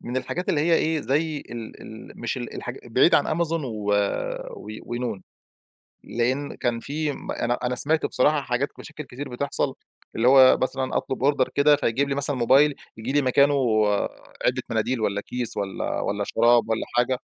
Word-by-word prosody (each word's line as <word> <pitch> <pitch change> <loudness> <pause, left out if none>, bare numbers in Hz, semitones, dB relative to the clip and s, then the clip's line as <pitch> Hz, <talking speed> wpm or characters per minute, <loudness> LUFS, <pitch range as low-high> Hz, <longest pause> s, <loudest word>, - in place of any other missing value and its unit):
من 125 +2 -5
الحاجات 180 +7 -3
اللي 150 - +2
هي 165 +2 +3
إيه، 160 -1 +1
زي 150 +4 0
ال 115 -4 -9
ال - - -11
مش - - -2
ال - - -6
الحاج - - -6
بعيد - - +4
عن 155 - +2
Amazon 165 -3 0
و 105 -4 -2 0.6
و 105 - -11
وnoon. 120 -5 -4 0.8
لأن 130 +5 -1
كان 120 -1 -1
في 150 +4 -2
أنا 120 -2 -2
أنا 125 0 0
سمعت 155 +5 +1
بصراحة 150 0 +2
حاجات 135 +2 -1
مشاكل 155 - -9
كتير 135 +2 -7
بتحصَل 140 +3 -2 0.4
اللي 120 +2 +3
هو 130 -1 +7
مثلًا 130 0 -1
أطلب 130 - -2
Order 135 -3 0
كده 145 +1 +5
فيجيب 135 +4 0
لي 140 - 0
مثلًا 140 0 -1
موبايل 135 +4 +4 0.2
ييجي 115 +4 -4
لي 145 0 +3
مكانه 140 +3 +4 0.9
علبة - - +1
مناديل 125 -2 0
والّا 100 -1 0
كيس 125 +1 -4
والّا 100 -2 -3
والّا 100 0 -1
شراب 120 +2 +3
والّا 110 0 0
حاجة. 125 +1 +2
130 Hz, 175 wpm, -24 LUFS, 120-145 Hz, 0.9 s, هو